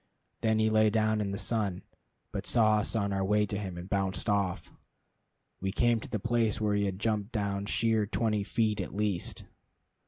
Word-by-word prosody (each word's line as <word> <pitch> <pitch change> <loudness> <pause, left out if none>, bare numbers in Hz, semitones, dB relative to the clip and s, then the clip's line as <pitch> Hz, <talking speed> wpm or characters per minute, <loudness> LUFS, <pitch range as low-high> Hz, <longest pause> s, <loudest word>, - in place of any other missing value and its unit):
Then 110 -1 +2
he 110 0 +2
lay 110 0 +4
down 110 0 +1
in 100 - -2
the 100 - -3
sun, 105 -5 0 0.5
but - - -4
saw 110 -2 +4
us 105 - -1
on 100 -2 0
our 95 0 0
way 105 +2 +2
to 100 - -4
him, 95 -4 -5
and 85 +1 -7
bounced 95 0 -1
off. 100 -4 0 0.9
We 95 +1 -2
came 120 +2 +2
to - - -9
the - - -1
place 115 0 +1
where 105 -1 +1
he 100 0 +1
had 95 -1 -2
jumped 105 0 -1
down 100 -2 -2
sheer 110 -1 +1
twenty 105 -1 0
feet 105 -1 0
at 95 - -6
least. 105 -4 -1
105 Hz, 195 wpm, -30 LUFS, 100-110 Hz, 0.9 s, lay